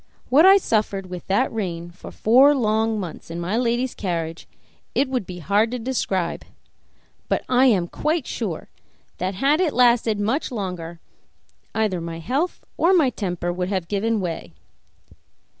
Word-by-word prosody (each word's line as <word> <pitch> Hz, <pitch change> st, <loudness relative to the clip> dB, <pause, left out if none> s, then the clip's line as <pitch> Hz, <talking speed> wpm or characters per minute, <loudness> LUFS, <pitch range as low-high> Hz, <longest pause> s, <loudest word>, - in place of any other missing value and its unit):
What 300 Hz, +8 st, +6 dB
I 390 Hz, +1 st, +9 dB
suffered 205 Hz, -, -1 dB
with 180 Hz, -1 st, -7 dB
that 210 Hz, +7 st, +1 dB
rein 175 Hz, -5 st, -4 dB
for 175 Hz, -, -11 dB
four 265 Hz, +6 st, +5 dB
long 220 Hz, -2 st, +1 dB
months 175 Hz, -4 st, -7 dB
in 165 Hz, +1 st, -5 dB
my 175 Hz, +5 st, -2 dB
lady's 240 Hz, +1 st, 0 dB
carriage 165 Hz, -3 st, -4 dB, 0.5 s
it 280 Hz, -, +2 dB
would 250 Hz, -7 st, -2 dB
be 180 Hz, -, -7 dB
hard 205 Hz, +6 st, +2 dB
to 250 Hz, -, -3 dB
describe; 225 Hz, -8 st, -2 dB, 0.9 s
but -, -, 0 dB
I 255 Hz, +1 st, +4 dB
am 190 Hz, -8 st, +3 dB
quite 310 Hz, -, -1 dB
sure 195 Hz, -9 st, -5 dB, 0.5 s
that, 185 Hz, +2 st, -2 dB
had 285 Hz, -, +2 dB
it 330 Hz, -5 st, +1 dB
lasted 235 Hz, -3 st, +3 dB
much 230 Hz, +10 st, -1 dB
longer, 180 Hz, -6 st, -5 dB, 0.8 s
either 210 Hz, -6 st, 0 dB
my 165 Hz, 0 st, -5 dB
health 270 Hz, -, -2 dB
or 350 Hz, +3 st, +4 dB
my 305 Hz, -8 st, +4 dB
temper 175 Hz, -5 st, -3 dB
would 180 Hz, +1 st, -2 dB
have 190 Hz, -4 st, -2 dB
given 215 Hz, +3 st, 0 dB
way. 165 Hz, -, -5 dB
210 Hz, 160 wpm, -23 LUFS, 180-250 Hz, 0.9 s, I